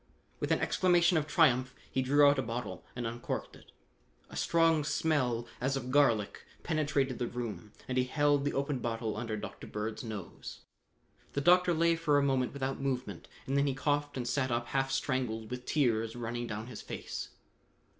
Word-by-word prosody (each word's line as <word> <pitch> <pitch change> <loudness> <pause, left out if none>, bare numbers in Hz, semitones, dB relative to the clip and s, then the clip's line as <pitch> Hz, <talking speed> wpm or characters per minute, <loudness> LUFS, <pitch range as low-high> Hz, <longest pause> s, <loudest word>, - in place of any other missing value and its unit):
With - - -2
an - - +3
exclamation 175 -1 +3
of 155 -2 +1
triumph 130 -6 +3 0.2
he 130 - +1
drew 145 +3 +5
out 140 -1 +4
a - - +3
bottle 115 -7 -5
and 120 -1 -3
uncorked 120 +1 -4
it. - - -18 0.6
A - - -9
strong 165 -2 +3
smell 130 -6 +1 0.2
as 135 +2 +1
of 130 -1 -5
garlic 120 -8 +2 0.2
penetrated 145 -5 0
the 120 - -1
room 115 -3 -5 0.2
and 130 0 0
he 125 - +2
held 145 +1 +2
the 145 - -1
opened 140 -2 -1
bottle 115 -2 -2
under 110 -1 -3
Dr. 105 -1 -7
Bird's 105 +2 -4
nose. 105 -6 -7 0.7
The 140 - 0
doctor 180 +2 +5
lay 165 +1 +3
for 155 -3 +2
a 145 - +3
moment 130 -3 +1
without 135 -1 -3
movement, 130 -2 -3 0.2
and 135 - -1
then 140 0 +3
he 135 - 0
coughed 145 0 0
and 120 -1 -3
sat 130 +1 0
up 120 0 -1
half 135 0 0
strangled 125 -5 -1
with 125 0 -6
tears 115 -6 +1
running 120 0 -3
down 105 0 -4
his 120 -3 -8
face. - - -6
130 Hz, 185 wpm, -31 LUFS, 120-145 Hz, 0.7 s, drew